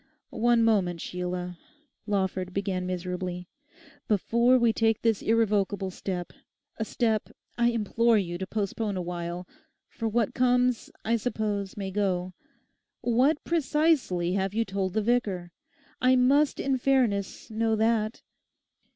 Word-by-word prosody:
'One 235 0 +3
moment, 190 -6 +2
Sheila,' 180 0 -4 0.5
Lawford 190 -2 -1
began 190 -2 -1
miserably. 180 0 -4 0.6
'Before 235 +4 +3
we 235 -2 +3
take 225 -1 +1
this 225 -3 +2
irrevocable 205 -3 +1
step, 180 -2 -5 0.4
a 220 - -2
step 220 -2 0 0.3
I 235 0 +2
implore 230 0 +2
you 175 -3 -2
to 190 - -4
postpone 205 0 -2
awhile—for 180 - -6
what 225 -1 0
comes, 250 -1 +2 0.2
I 230 +1 +2
suppose, 210 -4 -2
may 195 -1 -4
go—what 205 - -2
precisely 300 - +1
have 195 +1 -1
you 230 0 +1
told 195 -2 -2
the 220 - 0
vicar? 200 -7 0 0.5
I 255 0 +5
must 275 +4 +3
in 270 -1 0
fairness 235 -8 0
know 220 0 +1
that. 220 0 0
210 Hz, 120 wpm, -27 LUFS, 185-235 Hz, 0.6 s, I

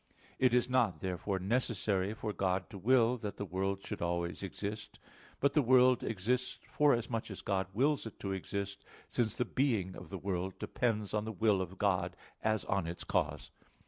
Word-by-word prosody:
It 125 -2 +4
is 125 - +3
not 120 -7 +2
therefore 95 +1 -2
necessary 100 -1 0
for 110 -1 -3
God 95 -1 -1
to 100 - -7
will 120 +3 +4
that 105 -4 -5
the 100 - -3
world 95 +2 -2
should - - -5
always 85 0 -1
exist; 100 +2 -5 0.4
but 140 0 +3
the 150 - +5
world 130 -1 +5
exists 120 +5 -1
forasmuch 120 -6 +2
as 95 - -7
God 95 -2 0
wills 135 +5 +1
it 110 - -11
to 100 - -2
exist, 100 +1 -4 0.2
since 115 -3 0
the 125 - +1
being 110 -8 0
of - - -10
the 95 - -4
world 95 0 -3
depends 110 -4 -1
on 105 -1 +1
the 110 - -3
will 105 -1 +2
of 95 +1 -5
God, 100 -3 +1 0.3
as 110 -2 +1
on 95 -4 0
its 85 +1 -5
cause. - - -1
105 Hz, 180 wpm, -33 LUFS, 95-120 Hz, 0.4 s, the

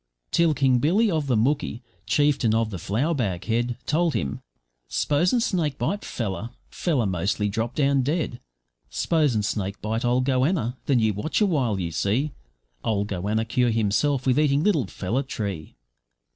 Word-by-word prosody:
Till 165 -3 +3
King 130 -3 +3
Billy, 195 - +3
of 155 -4 -1
the 125 - +2
Mooki, 125 0 0 0.2
chieftain 140 -6 +2
of 115 -1 +1
the 95 - -5
flour 125 - 0
bag 100 - -2
head, 120 +1 0
Told 165 +1 +1
him, 70 0 -2 0.5
`Spos'n 175 - +2
snake 170 - 0
bite 200 - -1
pfeller, 105 -1 -4 0.2
pfeller 140 - 0
mostly 95 +4 0
drop 115 +3 -2
down 140 -2 +3
dead; 145 -3 -1 0.5
Spos'n 145 -10 +1
snake 100 -1 -2
bite 110 +2 -2
old 125 +1 +2
goanna, 130 -1 +1
then 135 - +3
you 110 -2 +2
watch 105 +11 -1
a 210 - +4
while 130 - 0
you 85 -2 -3
see, 110 - 0 0.5
Old 105 -1 0
goanna 105 +4 -1
cure 120 +2 +1
himself 115 +5 +1
with 130 +2 +3
eating 145 -1 +2
little 160 - +2
pfeller 105 +8 -2
tree.' 100 - -5
125 Hz, 160 wpm, -25 LUFS, 105-150 Hz, 0.5 s, a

